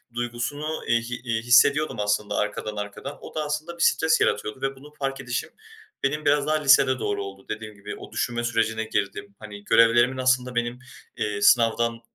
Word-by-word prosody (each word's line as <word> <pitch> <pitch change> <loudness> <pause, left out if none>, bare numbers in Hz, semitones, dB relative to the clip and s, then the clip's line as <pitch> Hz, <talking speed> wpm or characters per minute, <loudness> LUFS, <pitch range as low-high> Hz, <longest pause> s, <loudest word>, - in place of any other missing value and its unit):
duygusunu, 120 +6 -3
iii, 115 0 +3
hi 120 - -3
iii, 115 -2 -1
hissediyordum 135 +3 +4
aslında 105 0 0
arkadan 105 +1 -2
arkadan. 105 +7 -6
O - - -11
da 155 - -1
aslında 155 +3 -4
bir 170 - 0
stres 160 0 +3
yaratıyordu 105 +4 0
ve 135 0 -2
bunu 145 +3 -15
fark 135 0 -3
edişim 125 -1 -3 0.5
benim 150 +3 -1
biraz 145 0 +3
daha 155 - +2
lisede 135 -2 +5
doğru 100 -2 -2
oldu. 95 0 -10
Dediğim 110 0 -6
gibi 100 +1 -8
o - - -11
düşünme 120 -1 -2
sürecine 115 -1 0
girdim. 100 -1 -3
Hani, 105 -1 -10
görevlerimin 115 +3 +4
aslında 130 -1 +1
benim, 120 +1 -1 0.4
eee, 105 -1 -2
sınavdan 115 +1 +3
120 Hz, 180 wpm, -25 LUFS, 105-135 Hz, 0.5 s, lisede